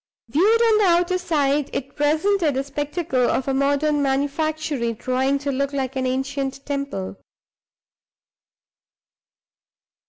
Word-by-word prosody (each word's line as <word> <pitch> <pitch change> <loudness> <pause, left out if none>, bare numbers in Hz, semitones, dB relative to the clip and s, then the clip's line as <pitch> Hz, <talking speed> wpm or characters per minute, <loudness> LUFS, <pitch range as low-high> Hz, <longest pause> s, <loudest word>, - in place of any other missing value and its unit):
Viewed 390 - +3
on 450 -2 +4
the 415 - +4
outer 355 +1 +2
side, 290 -4 0
it 275 +1 -5
presented 310 +2 +1
the 270 - 0
spectacle 285 -2 -1
of 265 - -1
a 270 - +1
modern 285 +2 +1
manufactory 285 -2 -1
trying 260 +4 0
to 280 0 -3
look 275 +1 -1
like 270 -1 -2
an 260 -1 -1
ancient 270 +1 -3
temple. 280 - -4
280 Hz, 120 wpm, -22 LUFS, 270-310 Hz, -, on